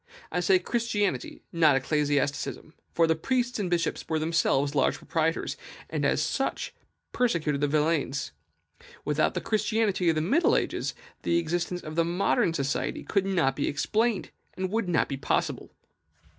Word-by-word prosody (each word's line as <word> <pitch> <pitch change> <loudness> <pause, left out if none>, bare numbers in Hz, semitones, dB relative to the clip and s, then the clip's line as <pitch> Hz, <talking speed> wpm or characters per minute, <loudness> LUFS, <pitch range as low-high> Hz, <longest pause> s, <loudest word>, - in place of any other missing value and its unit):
I - - 0
say 180 +2 +4
Christianity, 205 - -1
not 160 -4 +5
ecclesiasticism; 145 +2 -1 0.2
for 165 - +3
the 160 0 +2
priests 245 +6 -1
and 190 -3 -1
bishops 175 -1 0
were 160 - +1
themselves 155 -3 +1
large 140 - +2
proprietors, 165 0 -1 0.3
and - - -1
as - - +2
such - - -1
often - - -37 0.2
persecuted 160 - 0
the 145 - +3
villeins. 150 -2 0 0.7
Without - - +1
the - - -1
Christianity 215 -4 +1
of 165 - +2
the - - +1
middle 275 - +3
ages, - - -2 0.3
the 170 - +1
existence 175 +1 -1
of 155 0 -7
modern 175 0 +1
society 140 -2 -2
could 195 -2 0
not 165 -9 +2
be 145 - -1
explained, 220 +8 0 0.2
and 185 0 -3
would 220 -4 0
not 170 - +2
be 135 - -4
possible. - - -1
170 Hz, 155 wpm, -27 LUFS, 150-195 Hz, 0.7 s, not